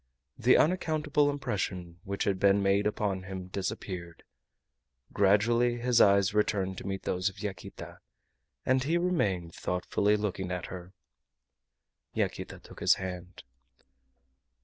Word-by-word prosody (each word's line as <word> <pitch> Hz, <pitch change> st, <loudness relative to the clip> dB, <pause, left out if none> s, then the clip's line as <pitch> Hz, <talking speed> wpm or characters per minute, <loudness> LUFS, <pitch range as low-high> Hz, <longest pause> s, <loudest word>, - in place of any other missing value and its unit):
The 125 Hz, +3 st, +5 dB
unaccountable 155 Hz, -4 st, +2 dB
impression 95 Hz, -10 st, -3 dB
which 100 Hz, 0 st, -2 dB
had 95 Hz, -2 st, 0 dB
been 100 Hz, 0 st, +4 dB
made 100 Hz, +1 st, +3 dB
upon 100 Hz, -3 st, -1 dB
him 95 Hz, -1 st, -7 dB
disappeared. 90 Hz, -3 st, -5 dB, 0.9 s
Gradually 115 Hz, +5 st, +3 dB
his 120 Hz, 0 st, +3 dB
eyes 100 Hz, -1 st, +5 dB
returned 100 Hz, -3 st, 0 dB
to -, -, -8 dB
meet 95 Hz, -1 st, -3 dB
those 90 Hz, +2 st, 0 dB
of 95 Hz, -, -16 dB
Yaquita, 95 Hz, -3 st, -7 dB, 0.7 s
and 130 Hz, 0 st, +2 dB
he 160 Hz, +5 st, +1 dB
remained 100 Hz, -, 0 dB
thoughtfully 100 Hz, +3 st, 0 dB
looking 95 Hz, -3 st, -3 dB
at 90 Hz, -1 st, -3 dB
her. 90 Hz, 0 st, -9 dB, 1.2 s
Yaquita -, -, -2 dB
took -, -, -13 dB
his -, -, +5 dB
hand. 90 Hz, -1 st, -7 dB
100 Hz, 125 wpm, -29 LUFS, 95-115 Hz, 1.2 s, The